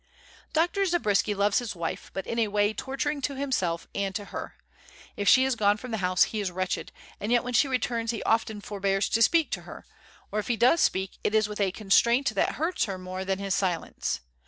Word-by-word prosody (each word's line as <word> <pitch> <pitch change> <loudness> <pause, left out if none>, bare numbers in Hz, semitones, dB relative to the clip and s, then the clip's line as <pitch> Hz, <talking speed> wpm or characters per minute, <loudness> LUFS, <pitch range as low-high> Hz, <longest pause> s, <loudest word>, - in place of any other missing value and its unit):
Dr. 345 +5 +1
Zabriskie 215 - +1
loves 200 +2 +2
his 235 -5 -5
wife, 170 -1 -4
but 195 - -3
in 230 - -2
a 225 - +2
way 205 +1 +1
torturing 280 +4 -3
to 275 +1 -2
himself 205 -12 -1
and 195 -1 -2
to 205 -1 -3
her. - - -6 0.6
If 205 -1 +1
she 260 +1 +6
is 265 -2 +1
gone 205 -2 +3
from 250 +3 -8
the 220 - -2
house 180 -1 +3
he 220 - -2
is 200 -2 -1
wretched, 185 0 -3 0.3
and 210 - -3
yet 240 0 +3
when 250 0 -4
she 280 - +4
returns 240 -3 -1
he 225 -2 -2
often 220 -2 0
forbears 195 -1 -1
to 230 - +1
speak 325 +7 +4
to - - -2
her, - - -11 0.5
or 215 - 0
if 210 - -4
he 240 - 0
does 255 +9 +4
speak 190 0 0
it 210 - +1
is 215 -1 +3
with 210 0 -5
a 195 -2 +2
constraint 235 +6 +3
that - - +1
hurts 330 +4 0
her 195 -2 -4
more 185 +1 -5
than 190 0 -1
his 195 -1 -2
silence. 185 -4 -1
210 Hz, 225 wpm, -27 LUFS, 195-250 Hz, 0.6 s, she